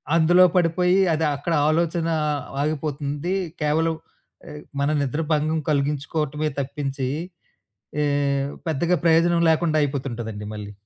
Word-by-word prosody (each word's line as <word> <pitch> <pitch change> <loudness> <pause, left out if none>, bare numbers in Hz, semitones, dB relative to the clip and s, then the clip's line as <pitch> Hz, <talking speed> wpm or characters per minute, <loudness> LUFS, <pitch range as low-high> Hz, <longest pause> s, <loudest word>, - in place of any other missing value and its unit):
అందులో 175 +3 +6
పడిపోయి 180 +2 +3
అది 160 0 0
అక్కడ 165 +4 -3 0.2
ఆలోచన 165 +1 0 0.6
ఆగిపోతుంది. 150 +2 -2 0.3
కేవలం 160 +2 +1 0.5
ఆహ్, 150 0 -9 0.2
మన 140 - +1
నిద్ర 140 +4 -1
భంగం 155 +1 +1
కలిగించుకోవటమే 150 +1 -1
తప్పించి, 135 -1 -3 0.9
ఎ - - +2 0.6
పెద్దగా 165 +4 +1
ప్రయోజనం 170 +1 +4
లేకుండా 160 -1 +2
అయిపోతుంటదండి 120 -7 -3
మళ్ళీ. 105 -1 -7
155 Hz, 105 wpm, -23 LUFS, 140-165 Hz, 0.9 s, అందులో